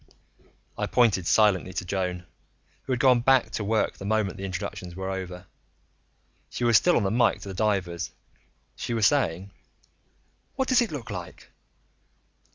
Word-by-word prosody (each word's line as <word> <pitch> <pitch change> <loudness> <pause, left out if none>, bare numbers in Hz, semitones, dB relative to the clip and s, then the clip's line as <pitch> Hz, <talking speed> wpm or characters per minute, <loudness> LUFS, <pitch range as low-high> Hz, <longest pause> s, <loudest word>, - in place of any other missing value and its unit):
I - - 0
pointed 105 -8 +2
silently 100 -4 +3
to 90 - -4
Joan, 90 -1 -3 0.6
who 135 - -4
had 125 - 0
gone 130 -2 +5
back 130 +1 +3
to 110 - -3
work 110 +2 0
the - - -7
moment 105 -2 0
the 95 - -6
introductions 95 -1 -6
were 95 +1 -4
over. 90 -2 -6 1.0
She - - -5
was 120 -1 +4
still 175 +10 +5
on 115 - +1
the 95 - 0
mike 120 +2 +2
to 100 - -8
the - - -5
divers. 95 -5 -1 0.7
She 120 - -4
was 110 -2 +2
saying: 100 - +1 1.0
"What 265 -1 -1
does 255 -1 +5
it 235 - -1
look 120 -7 -6
like?" 90 -3 -8
100 Hz, 165 wpm, -26 LUFS, 95-120 Hz, 1.0 s, gone